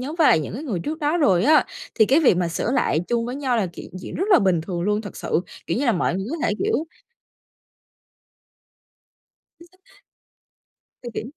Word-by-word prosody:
nhóm 285 +5 -5
với 315 - +5
lại 155 - +4
những 150 - -6
cái 275 - -5
người 220 - -3
trước 310 - -4
đó 300 +3 0
rồi 195 - +3
á, 300 0 +5 0.3
thì 220 - +5
cái 285 +5 +4
việc 250 - +4
mà 175 -2 0
sửa 185 +7 -2
lại 160 - +1
chung 235 -1 0
với 250 - -4
nhau 260 -4 0
là 210 - +1
chuyện 175 - -10
chuyện - - -8
rất 375 - -1
là - - +8
bình 185 -4 +2
thường 175 +1 -5
luôn. 210 +2 0
Thật 205 -3 -9
sự, 165 - -1 0.3
kiểu 165 - -1
như 285 - 0
là, 235 - +4
mọi 175 0 0
người 195 +2 -3
có 330 - -2
thể, - - +1
kiểu 330 -7 -1 2.7
Chính 340 - -16
xác. 380 +2 -26 1.1
Thì 240 - -5
kiều - - -3
240 Hz, 215 wpm, -22 LUFS, 185-305 Hz, 2.7 s, là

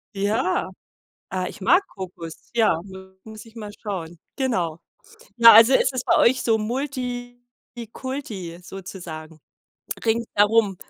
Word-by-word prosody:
Ja, 200 -2 0 0.6
ah, 185 0 -2
ich - - -10
mag 360 - +4
Kokos. 175 -4 -9
Ja, 215 -8 +3 0.4
muss 220 +1 -11
ich 225 - -17
mal 210 -2 -7
schauen. 175 -5 -5 0.2
Genau, 180 - -1 0.6
ja, 230 -1 +10
also 230 +4 +8
es 260 - +3
ist 255 -2 -4
bei - - +4
euch 255 +2 +4
so 225 -1 +2
multikulti 245 - -6
sozusagen 170 -5 -9 0.7
ringsherum. 220 -3 +2
220 Hz, 115 wpm, -23 LUFS, 185-245 Hz, 0.7 s, ja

